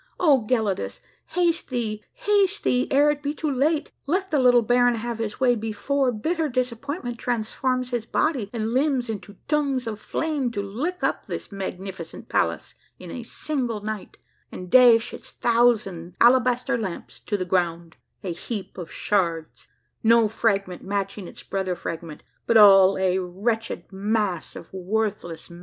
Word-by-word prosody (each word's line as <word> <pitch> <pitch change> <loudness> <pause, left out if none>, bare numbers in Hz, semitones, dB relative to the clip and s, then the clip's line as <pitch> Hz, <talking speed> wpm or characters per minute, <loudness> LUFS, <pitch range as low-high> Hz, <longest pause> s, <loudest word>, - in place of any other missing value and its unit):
O 275 -10 +4
Gelidus, 220 -6 0 0.3
haste 340 -2 0
thee, 220 -4 -3
haste 410 -5 +1
thee, 250 0 +2
ere 290 +2 +4
it 295 0 -5
l)e 290 +1 -2
too 310 -2 -2
late, 290 +4 +1 0.2
let 375 +5 0
the 300 - +3
little 245 -2 +5
baron 245 +1 +3
have 230 0 -4
his 215 -2 -4
way 255 -2 +4
before 240 +5 0
bitter 315 +8 -1
disap 250 -2 -1
pointment 280 -5 -5
transforms 250 +2 -1
his 240 -2 -2
body 265 -10 0
and 225 -1 -2
limbs 260 -3 +1
into 205 -1 -8
tongues 280 -4 0
of 215 -2 -4
flame 295 0 -1
to 230 -3 -5
lick 275 - -4
up - - -1
this - - -6
magnificent 190 -3 -7
palace 85 -1 0 0.2
in 180 -2 -10
a 250 - -5
single 240 -2 -3
night, 215 -1 -6 0.3
and 180 -1 -8
dash 240 -2 +6
its - - -10
thousand 215 -8 +1
alabaster 250 +1 +4
lamps 190 -6 -6
to 205 - -2
the 185 - -3
ground, 170 -2 -1 0.3
a 180 -3 -3
heap 195 +1 -6
of 170 - -7
sheards, 170 -6 -1 0.3
no 230 0 +5
fragment 200 -4 -1
matching 195 -1 -3
its - - -11
brother 190 -2 -2
fragment, 165 -2 -7 0.2
but 230 - +5
all 195 -2 +8
a 190 0 +1
wretched 200 +2 -2
mass 205 -1 -1
of 170 - -11
worthless 190 -3 -2
matter 170 - -11
225 Hz, 160 wpm, -24 LUFS, 195-255 Hz, 0.3 s, all